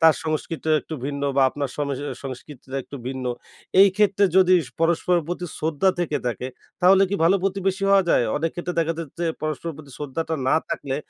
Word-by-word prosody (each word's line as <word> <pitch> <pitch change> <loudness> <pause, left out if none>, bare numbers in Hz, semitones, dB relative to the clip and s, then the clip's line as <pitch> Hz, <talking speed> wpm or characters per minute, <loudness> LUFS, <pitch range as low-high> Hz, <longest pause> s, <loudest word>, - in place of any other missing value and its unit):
তার 160 -1 +7
সংস্কৃতিও 155 0 -2
একটু 160 - -7
ভিন্ন 140 0 -3
বা 135 - +5
আপনার 140 0 -3
সম 145 - -1
এ - - -6 0.3
সংস্কৃতিটা 135 0 -8
একটু 140 - -9
ভিন্ন। 130 0 -4 0.6
এই 200 - +9
ক্ষেত্রে 205 -1 +3
যদি 185 -1 +6
স - - -19
পরস্পরের 170 +1 +2
প্রতি 175 0 -3
শ্রদ্ধা 160 +4 +1
থেকে 155 -4 0
থাকে 120 +1 -2 0.3
তাহলে 190 +2 +6
কি - - 0
ভালো 180 +4 +5
প্রতিবেশী 195 0 -1
হওয়া 195 -1 +6
যায়? - - +4
অনেক 165 +2 0
ক্ষেত্রে 175 0 -4
দেখা 165 0 0
যায় 165 - -4
যে, 170 - 0 0.2
পরস্পরের 155 +1 -3
প্রতি 145 -3 -12
শ্রদ্ধাটা 155 +3 -3
না - - +4
থাকলে 135 -1 -3
160 Hz, 195 wpm, -23 LUFS, 145-180 Hz, 0.6 s, এই